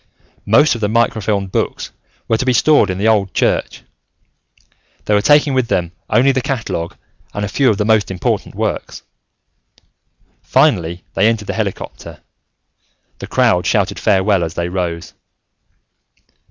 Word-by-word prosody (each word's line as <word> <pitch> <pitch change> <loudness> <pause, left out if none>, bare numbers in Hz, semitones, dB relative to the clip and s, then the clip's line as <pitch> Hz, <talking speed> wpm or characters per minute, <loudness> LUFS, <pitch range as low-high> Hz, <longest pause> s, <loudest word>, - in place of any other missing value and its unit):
Most 155 - +4
of 115 - -6
the 105 - +1
microfilmed 110 -4 0
books - - -2 0.4
were 115 - +1
to - - 0
be 130 - +2
stored 135 -3 +4
in 95 - -2
the 105 +3 0
old 105 -4 +1
church. - - -1 1.2
They 105 - 0
were 105 - +3
taking 145 +3 +4
with 130 -2 +1
them 85 -7 -1 0.2
only 125 +5 +4
the 130 -1 -1
catalogue 110 -10 -4 0.4
and 105 0 -2
a - - -3
few 130 +6 +2
of 105 - +1
the 105 - -1
most 110 -1 +2
important 95 -2 -2
works. - - -4 1.4
Finally, 85 +1 +1
they 100 +3 +3
entered 115 -2 0
the - - -1
helicopter. - - -5 1.0
The - - -7
crowd - - +2
shouted - - 0
farewell 95 -2 +2
as 80 +1 -5
they 85 0 -2
rose. 90 -2 -4
105 Hz, 150 wpm, -17 LUFS, 95-115 Hz, 1.4 s, Most